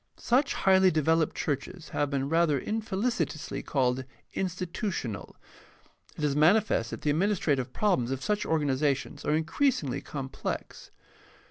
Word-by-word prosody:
Such 265 +4 +2
highly 190 -1 +5
developed 160 -1 +2
churches 160 +4 -3
have 145 - 0
been 140 -1 -1
rather 165 -1 +3
infelicitously 215 - -2
called 130 -2 0 0.3
institutional. 180 - -3 0.8
It - - -5
is 145 -2 +1
manifest 160 - +3
that - - -6
the 150 - +2
administrative 155 -7 +1
problems 180 - +1
of 135 0 -3
such 210 -1 0
organizations 145 -2 0
are 150 - +2
increasingly 160 - 0
complex. 135 -3 -5
160 Hz, 120 wpm, -28 LUFS, 140-190 Hz, 0.8 s, highly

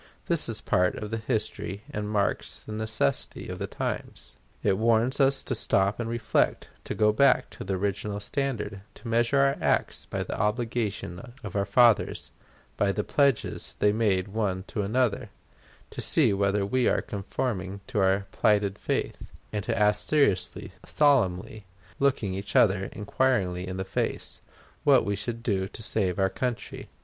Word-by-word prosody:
This - - +2
is - - -2
part 90 0 +2
of 105 0 -6
the 115 - -1
history 110 -3 -3
and 105 0 -3
marks 105 -2 -1
the - - -9
necessity 110 -9 -1
of - - -6
the - - -3
times. - - -5 0.3
It 100 -1 +2
warns 115 +4 +2
us 135 0 +4
to - - -2
stop 100 -2 +2
and 115 -1 -2
reflect, 115 0 0 0.2
to - - -4
go 105 0 +3
back 135 +3 +3
to - - -8
the 95 - -2
original 100 +1 -2
standard, 110 -3 -3
to - - -11
measure 120 +4 +2
our 140 0 +3
acts - - 0
by - - -3
the - - -5
obligation 110 -2 -2
of 105 - -7
our 100 -1 +1
fathers, 115 +2 +3 0.5
by 100 -1 +2
the 105 +1 -2
pledges 140 -1 0
they 105 0 +3
made 100 -4 +1
one 100 -3 -1
to 105 - -2
the 110 +5 -2
other, 125 -5 0 0.6
to - - -4
see - - +3
whether 100 0 +1
we 125 +4 +1
are - - +1
conforming 100 -1 -4
to 105 - -2
our 95 +1 +2
plighted 105 -1 +2
faith, - - -2 0.3
and 105 -2 -2
to 115 -1 -1
ask 105 0 +3
seriously, 140 -12 +1
solemnly, 110 -8 +1 0.3
looking 130 -8 +1
each 100 +1 -5
other 95 -3 +4
inquiringly 100 -5 0
in 95 0 -5
the 95 - -3
face, - - -3 0.4
what - - +5
we 100 - 0
should 115 +3 -5
do 95 -5 0
to 110 - -9
save 95 -4 0
our 95 - +3
country. 120 +5 -4
105 Hz, 170 wpm, -27 LUFS, 100-120 Hz, 0.6 s, what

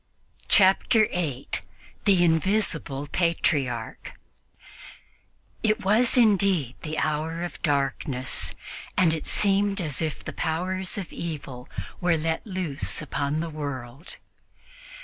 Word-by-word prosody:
Chapter 210 +3 +5
8 145 -7 -2 0.4
THE 190 -4 +5
INVISIBLE 160 -5 +1
PATRIARCH 140 -9 0 1.5
IT 215 -3 +1
was 230 +6 +4
indeed 195 - +3
the 155 0 -4
hour 160 +2 -1
of 175 - -6
darkness, 135 -3 -1 0.4
and 170 -3 +5
it 160 - -4
seemed 200 0 +2
as 155 -6 -2
if 155 -2 -2
the - - -5
powers 185 +4 -2
of 190 -5 -5
evil 140 -7 -6 0.3
were 175 -2 +2
let 160 +5 -2
loose 180 -7 -1
upon 145 +1 -1
the 170 - -3
world. 140 -1 -6
165 Hz, 110 wpm, -26 LUFS, 145-190 Hz, 1.5 s, Chapter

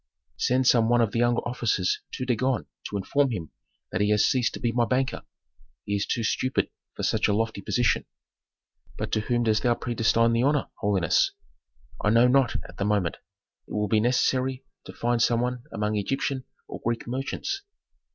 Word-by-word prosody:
"Send 130 +1 +2
some 115 -2 +4
one 120 0 +4
of 115 -3 +2
the 115 - -1
younger 120 0 +2
officers 115 -6 0
to 130 - -3
Dagon 130 0 0 0.2
to 100 - -3
inform 140 +8 +1
him 90 -10 -5 0.4
that - - -1
he 105 - +2
has 105 -1 +4
ceased 125 -3 +1
to - - -7
be 120 - 0
my 120 +1 +2
banker. 130 +2 0 0.6
He 100 - -1
is 100 - -1
too 115 - -1
stupid 130 +4 0 0.2
for - - -5
such - - +2
a - - +2
lofty 110 -2 -1
position." 120 +2 +1 0.9
"But - - -4
to - - +2
whom 120 +2 0
dost 110 -1 +2
thou 120 0 +2
predestine 115 0 +2
the 115 - +2
honor, 145 +2 +1
holiness?" 105 - +2 0.7
"I 105 - +3
know 115 +3 +5
not 130 -1 +3
at - - -14
the - - +1
moment. 100 -4 0 0.5
It - - -10
will 105 0 0
be 110 +2 +3
necessary 130 +2 +1 0.2
to - - -7
find 120 0 0
some 115 0 +3
one 125 0 -2
among 105 -1 -1
Egyptian 135 +5 -1 0.2
or - - -8
Greek 115 0 -1
merchants. 135 - -3
120 Hz, 190 wpm, -26 LUFS, 105-125 Hz, 0.9 s, know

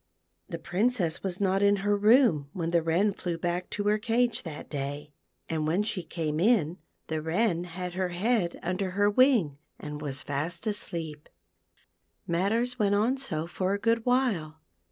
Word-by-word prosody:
The 170 - -4
Princess 180 0 0
was 185 -2 -3
not 195 -1 +2
in 200 0 +5
her 205 0 +3
room 205 - +4
when 170 -2 -2
the 170 -1 +3
Wren 175 +6 +2
flew 175 -3 -4
back 175 +1 -2
to 205 - -3
her 210 +1 +2
cage 235 +2 +1
that 160 -4 -8
day, 145 +1 -5 0.3
and 155 -1 -1
when 175 +6 +2
she 210 -3 -2
came 160 -2 -3
in 180 -5 +2 0.3
the 160 -1 -3
Wren 175 +2 0
had 180 +1 -6
her 185 0 -1
head 185 0 0
under 185 +2 -1
her 205 0 +4
wing 210 - +3 0.2
and 150 0 -7
was 140 -3 -3
fast 160 +7 -3
asleep. 165 -8 -3 1.0
Matters 225 +8 0
went 205 -1 +3
on 225 +6 +2
so 165 - -2
for 185 +3 -1
a - - -4
good 230 +1 +1
while. 220 -12 0
180 Hz, 170 wpm, -28 LUFS, 160-210 Hz, 1.0 s, in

